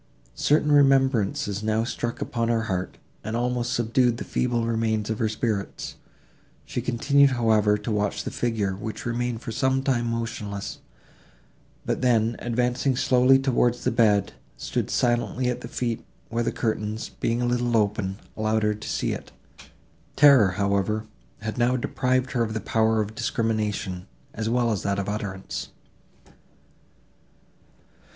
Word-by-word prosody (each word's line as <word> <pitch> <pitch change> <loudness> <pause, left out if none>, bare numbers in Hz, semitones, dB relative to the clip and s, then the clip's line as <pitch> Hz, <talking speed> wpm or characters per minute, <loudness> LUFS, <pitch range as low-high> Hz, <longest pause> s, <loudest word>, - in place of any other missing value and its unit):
Certain 150 - +2
remembrances 135 -8 +3
now 110 +1 +1
struck 115 0 -4
upon 115 -1 -2
her 115 -1 +1
heart, 95 -4 -3 0.3
and 110 +2 -3
almost 120 0 -1
subdued 120 +1 +2
the - - -4
feeble 120 -2 0
remains 110 -2 0
of 110 - -3
her 110 - +1
spirits; 110 -2 -3 0.7
she 125 - -3
continued, 140 +4 +3
however, 110 -4 +3
to 105 +2 -5
watch 105 -1 -1
the - - -4
figure, 110 -5 -1
which 110 +3 -6
remained 120 -1 -2
for - - -5
some 130 +3 +1
time 120 -4 +1
motionless, 115 -3 -4 1.1
but - - -1
then, 115 -2 +2
advancing 125 +2 0
slowly 125 +1 +5
towards 125 -2 +1
the - - +1
bed, 105 -4 +3 0.2
stood - - -2
silently 120 +1 +1
at 125 - -5
the - - -6
feet, 120 -1 -3 0.3
where 115 +1 -1
the 115 - 0
curtains, 110 -1 -2
being 115 +1 0
a 125 - 0
little 120 -1 +1
open, 100 -2 0 0.2
allowed 110 0 0
her 105 - +3
still 105 - -10
to - - -6
see - - -1
it; - - -6 0.8
terror, 140 -9 +7
however, 100 +2 0 0.4
had 110 +1 -4
now 120 +2 +3
deprived 130 +1 0
her 125 - 0
of 110 -1 -1
the - - 0
power 110 +1 +2
of 105 +1 -4
discrimination, 110 -6 -2 0.3
as 110 0 -2
well 120 -1 +2
as 105 - 0
of - - -9
that 100 0 0
of 100 - -3
utterance. 105 -2 -4
115 Hz, 155 wpm, -25 LUFS, 105-125 Hz, 1.1 s, terror